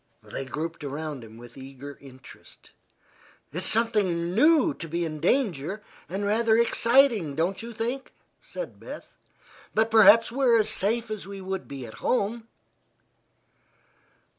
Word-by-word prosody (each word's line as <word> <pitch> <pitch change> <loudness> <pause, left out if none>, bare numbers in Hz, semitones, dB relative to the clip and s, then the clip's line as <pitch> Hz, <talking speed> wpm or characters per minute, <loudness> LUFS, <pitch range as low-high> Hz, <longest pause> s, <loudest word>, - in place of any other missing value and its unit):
They 135 - -6
grouped 155 +5 -5
around 145 -1 -5
him 110 0 -13
with 120 0 -13
eager 135 +1 -10
interest. 130 -1 -15 0.8
"It's 180 +4 -3
something 195 -7 0
new 310 - +4
to 165 - -8
be 170 +2 -2
in 155 -1 -5
danger, 200 - 0 0.3
and 195 +3 -3
rather 220 +2 +3
exciting, 235 - +3
don't 180 +7 -1
you 235 +1 -7
think?" 235 +4 -4 0.3
said - - -8
Beth. - - -10 0.6
"But 220 +1 +2
perhaps 225 +1 +7
we're 250 -2 +3
as 215 -1 +1
safe 225 +2 -1
as 210 -3 -5
we 200 0 -7
would 190 0 -5
be 135 -3 -7
at 110 - -10
home." 230 -1 0
200 Hz, 140 wpm, -26 LUFS, 155-230 Hz, 0.8 s, perhaps